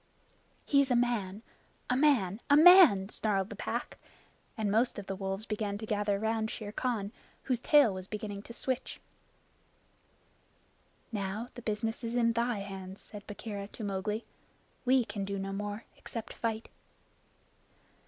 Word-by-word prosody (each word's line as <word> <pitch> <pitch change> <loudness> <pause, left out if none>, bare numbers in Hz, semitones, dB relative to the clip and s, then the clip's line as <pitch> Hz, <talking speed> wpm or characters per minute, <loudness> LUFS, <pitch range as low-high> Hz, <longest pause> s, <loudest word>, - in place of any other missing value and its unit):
"He 280 -1 +5
is 275 - 0
a 250 - +3
man 225 -4 0 0.4
a 250 - +1
man 240 -8 +3
a 285 - +7
man!" 320 - +8
snarled 200 -3 -1
the - - -5
Pack. - - -4 0.6
And 215 -2 0
most 230 +4 +2
of 205 - -5
the 195 - -4
wolves 195 +2 -3
began 210 -2 -2
to 220 - -6
gather 205 -1 0
round 220 +1 0
Shere 210 -2 -5
Khan, 215 -4 -2 0.3
whose 250 -3 0
tail 280 -5 +5
was 185 0 -7
beginning 205 -1 -5
to - - -6
switch. 260 +1 -3 2.1
"Now 210 +2 -3
the 245 - -9
business 225 +1 -2
is 230 +1 -3
in 230 -1 +3
thy 235 -2 0
hands," 195 -1 -7
said 205 -1 -11
Bagheera 205 -1 -6
to 220 - -9
Mowgli. 205 +2 -2 0.6
"We 255 -1 +4
can 200 -2 -4
do 200 0 -3
no 195 0 -3
more 205 +2 -4
except 230 -2 -7
fight." 225 -1 -3
215 Hz, 155 wpm, -31 LUFS, 200-240 Hz, 2.1 s, man